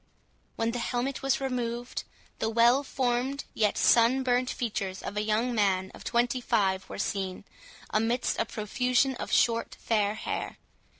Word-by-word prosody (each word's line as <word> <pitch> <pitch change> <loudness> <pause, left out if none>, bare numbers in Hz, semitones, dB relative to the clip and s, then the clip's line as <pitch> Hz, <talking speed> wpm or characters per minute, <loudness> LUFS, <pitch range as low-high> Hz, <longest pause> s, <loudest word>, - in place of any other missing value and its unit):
When 225 0 0
the 245 - -3
helmet 245 +3 -2
was 270 -2 +1
removed, 245 -2 -3 0.3
the 220 - 0
well 235 +4 +5
formed, 260 +1 -1
yet 210 -2 +1
sun 240 +3 +4
burnt 250 0 +1
features 200 -5 -3
of - - -5
a 210 - 0
young 220 +3 0
man 190 -4 +1
of - - -12
twenty 245 +2 +1
five 190 -5 +1
were - - -6
seen, 190 -2 -3 0.5
amidst 230 +3 0
a - - +2
profusion 250 +5 +1
of - - -5
short 230 -1 +2
fair 210 -2 +1
hair. - - -4
235 Hz, 155 wpm, -28 LUFS, 210-250 Hz, 0.5 s, well